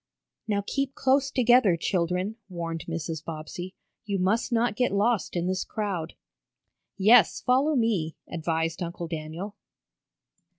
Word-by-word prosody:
"Now 200 -2 0
keep 275 +3 -2
close 270 +1 +2
together, 240 -8 +4
children," 180 +4 -1
warned 165 -2 -4
Mrs. 165 -1 -4
Bobbsey. 165 +3 -7 0.3
"You 200 -1 -2
must 200 +7 +1
not 230 -2 +2
get 250 +2 +1
lost 205 +1 +1
in 175 0 0
this 185 0 0
crowd." 195 -7 -3 0.8
"Yes, 210 -1 +5
follow 270 +5 +3
me," 210 - +1
advised 165 0 -2
Uncle 170 0 -4
Daniel. 165 +5 -6
190 Hz, 125 wpm, -27 LUFS, 165-230 Hz, 0.8 s, Yes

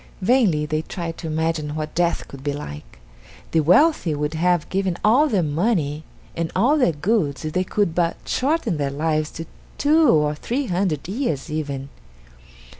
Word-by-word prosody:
Vainly 195 -10 +3
they 155 0 -1
tried 165 0 -6
to 165 - -5
imagine 160 -1 -1
what 155 0 -4
death 175 0 0
could 135 -1 -11
be 145 0 -1
like. 75 - -8 0.5
The 165 - +3
wealthy 180 - +4
would 150 +1 -2
have 175 0 +1
given 190 -2 -1
all 255 +8 +5
their 200 -8 +1
money 155 -2 0 0.3
and 165 -1 -2
all 260 +11 +3
their 250 - +4
goods 155 -3 -1
if 155 - -4
they 185 - +1
could 190 -2 0
but 170 -1 0
shorten 265 - 0
their 140 -1 -1
lives 155 +2 -1
to 165 - -6 0.3
two 305 0 +4
or 150 -4 +3
three 245 - -3
hundred 175 - -1
years 190 - -2
even. 140 -3 -4
165 Hz, 170 wpm, -22 LUFS, 150-200 Hz, 0.5 s, all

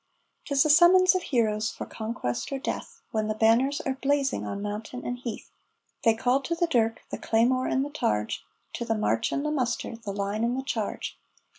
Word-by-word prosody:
'Tis 280 -1 +3
the 305 - 0
summons 365 +4 +7
of 370 - 0
heroes 220 -6 +1
for - - -6
conquest 220 - -4
or 275 - -1
death, 270 - -5
When 215 -1 0
the 215 - -1
banners 245 +7 +3
are 265 -3 -3
blazing 280 -1 +1
on 200 - -4
mountain 210 +4 -5
and 245 0 -3
heath; 235 -3 -6 0.5
They 225 -3 +5
call 250 +4 +2
to 335 +5 -2
the 345 +1 +2
dirk, 230 -8 +1
the - - -4
claymore 250 +3 +2
and 265 +1 +1
the 290 - -7
targe, 105 - 0 0.4
To - - -3
the 225 -1 0
march 115 - +1
and 280 - -1
the 300 - 0
muster, 245 -4 -1
the 225 -3 -6
line 200 +2 -2
and 240 +2 +1
the 265 - -2
charge. 220 -6 -3
240 Hz, 200 wpm, -27 LUFS, 220-275 Hz, 0.5 s, summons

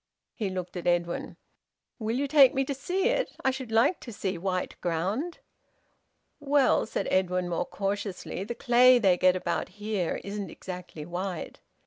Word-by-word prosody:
He 210 -5 -2
looked 185 -1 -5
at 175 - -4
Edwin: 175 0 0 0.6
"Will 225 +1 -1
you 280 +1 0
take 275 -2 +6
me 270 0 +1
to 280 - -2
see 360 +8 -2
it? - - -1
I 265 - +5
should 260 -3 -6
like 230 +10 +3
to 240 - -9
see 195 -3 -3
white 185 +1 -2
ground." 195 - -1 1.0
"Well," 285 -1 +3
said - - -2
Edwin, 180 -1 +1
more 175 0 -2
cautiously, 200 -1 -3
"the 235 +4 -5
clay 250 +1 +6
they 195 -6 +4
get 185 +1 +4
about 185 - -2
here 205 -4 -2
isn't 200 0 -5
exactly 180 -4 -8
white." 175 +1 -5
200 Hz, 160 wpm, -28 LUFS, 180-255 Hz, 1.0 s, take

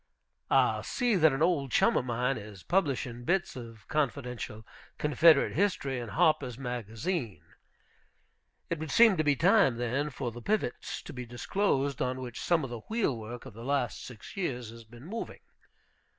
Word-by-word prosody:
I - - +3
see 245 -3 0
that 160 -4 +5
an 135 +3 0
old 150 -7 +1
chum - - +4
of - - +1
mine 125 +2 0
is 105 -4 -9
publishing 135 -9 0
bits 175 +4 0
of 115 -4 -10
confidential 125 -6 -2 0.3
Confederate 150 +1 +5
History 145 -8 0
in 120 -2 -6
Harper's 125 +2 +2
Magazine. 120 - -3 1.3
It 165 - -1
would 160 0 -5
seem 225 +4 +6
to 155 - +2
be 145 -2 +3
time, 180 - +4
then, 125 +5 -1
for 130 -3 -4
the 120 +1 -9
pivots 210 - -2
to - - -9
be 125 -2 -6
disclosed 140 - 0
on 130 0 -1
which 120 -2 -6
some 170 -3 +2
of 130 - -5
the 120 - -5
wheelwork 120 - -2
of - - -10
the 115 +2 -10
last 135 -2 -1
six 120 -4 -10
years 125 - -3
has 115 0 -12
been 120 +4 -14
moving. 225 +6 -6
130 Hz, 165 wpm, -30 LUFS, 120-160 Hz, 1.3 s, seem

